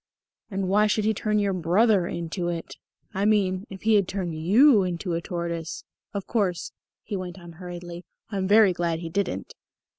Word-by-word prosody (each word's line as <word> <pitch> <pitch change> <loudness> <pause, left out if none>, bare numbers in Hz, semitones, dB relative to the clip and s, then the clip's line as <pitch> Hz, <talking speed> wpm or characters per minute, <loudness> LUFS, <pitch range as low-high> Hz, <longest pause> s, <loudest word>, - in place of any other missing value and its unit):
"And 195 -2 -2
why 210 +3 +4
should 210 0 +1
he 220 - +3
turn 210 +1 0
your 200 -2 +1
brother 185 +2 +3
into 170 +1 -3
it? 170 -1 -4 0.4
I 195 0 -1
mean, 200 -2 +2
if 195 -1 -10
he 220 0 +4
had 200 -3 +4
turned 185 -4 -3
you 210 - +5
into 180 0 -2
a 165 - -1
tortoise 170 -2 -4 0.3
Of 200 -2 -4
course," 195 -7 -1 0.3
he 210 - -4
went 185 -1 -5
on 175 -2 -11
hurriedly, 175 0 -8 0.3
"I'm 195 -2 -1
very 205 -2 +6
glad 170 -1 -1
he 165 - -5
didn't." 200 +4 -2
185 Hz, 180 wpm, -25 LUFS, 175-205 Hz, 0.4 s, very